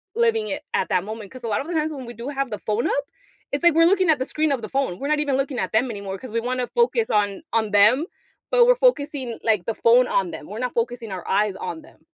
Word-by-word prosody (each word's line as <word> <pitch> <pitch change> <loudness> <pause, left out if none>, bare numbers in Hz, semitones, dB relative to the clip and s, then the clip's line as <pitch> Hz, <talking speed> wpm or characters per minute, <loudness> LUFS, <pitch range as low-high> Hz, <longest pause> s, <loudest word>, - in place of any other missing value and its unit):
living 455 -2 +2
it - - -3
at 470 - 0
that 185 -1 +1
moment 215 -1 -8
'cause 255 -2 -11
a - - -3
lot 210 -2 0
of 290 - -8
the 350 - -4
times 315 0 0
when 270 -4 -7
we 240 - -8
do 240 +4 -6
have 275 -4 -3
the 210 - -4
phone 215 +2 -1
up, 280 0 -1 0.5
it's 285 +4 -2
like 345 -2 +6
we're 330 +1 +5
looking 370 -1 +3
at 295 - +1
the 260 - -1
screen 310 -1 0
of 260 -4 -1
the - - -6
phone, 265 -10 -1
we're 280 - -3
not 305 0 +1
even 280 -3 0
looking 275 -1 -2
at - - -2
them 240 +3 +2
anymore 200 -2 -5
'cause 255 -4 -9
we 230 - 0
wanna 250 +1 -2
focus 470 -1 +1
on 205 -2 +1
on 220 -2 +1
them, 215 +10 +5 0.5
but - - +6
we're - - +6
focusing, 290 - +1
like, 215 -5 +1
the 225 - -2
phone 245 +2 +4
on 185 -3 0
them, - - -8
we're 210 - -7
not 250 -1 -2
focusing 230 -2 -2
our 185 -2 -6
eyes 205 0 +1
on 320 - -5
them. - - -19
255 Hz, 280 wpm, -23 LUFS, 215-305 Hz, 0.5 s, like